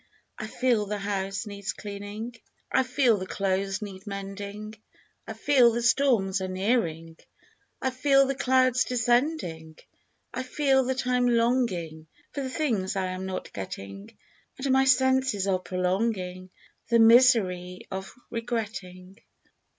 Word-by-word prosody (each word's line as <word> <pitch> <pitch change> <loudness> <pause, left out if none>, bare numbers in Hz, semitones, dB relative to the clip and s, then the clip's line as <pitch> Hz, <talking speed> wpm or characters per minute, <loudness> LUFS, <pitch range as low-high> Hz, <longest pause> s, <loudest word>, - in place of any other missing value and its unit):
I 215 - -4
feel 235 -3 +1
the 210 +1 -2
house 195 0 -3
needs 200 -1 -5
cleaning, 205 +3 -7 0.4
I - - +4
feel 255 -3 +2
the 185 - -5
clothes 195 +2 -1
need 195 0 -9
mending, 200 +1 -6 0.5
I - - -5
feel 250 -5 +4
that 235 +1 -1
storms 230 -7 +2
are 190 - -2
nearing, 185 -5 -1 0.7
I 260 - +1
feel 275 +1 +4
the 275 - -1
clouds 255 -2 +3
descending. 240 - 0 0.6
I - - -2
feel 265 0 +2
that 260 +1 -2
I 250 0 +2
am 245 0 +2
longing 230 -10 0 0.3
For 285 - -3
the 265 - -3
things 230 -11 -1
I 190 -1 -1
am 185 +1 -5
not 190 - -5
getting. 100 0 -8 0.4
And 270 0 -1
my 265 0 +4
senses 260 -5 +3
are 190 -2 +1
prolonging 185 0 -2 0.4
The 235 - +4
misery 225 -7 +4
of 190 0 -5 0.2
regretting. 210 -5 -5
210 Hz, 135 wpm, -27 LUFS, 190-255 Hz, 0.7 s, I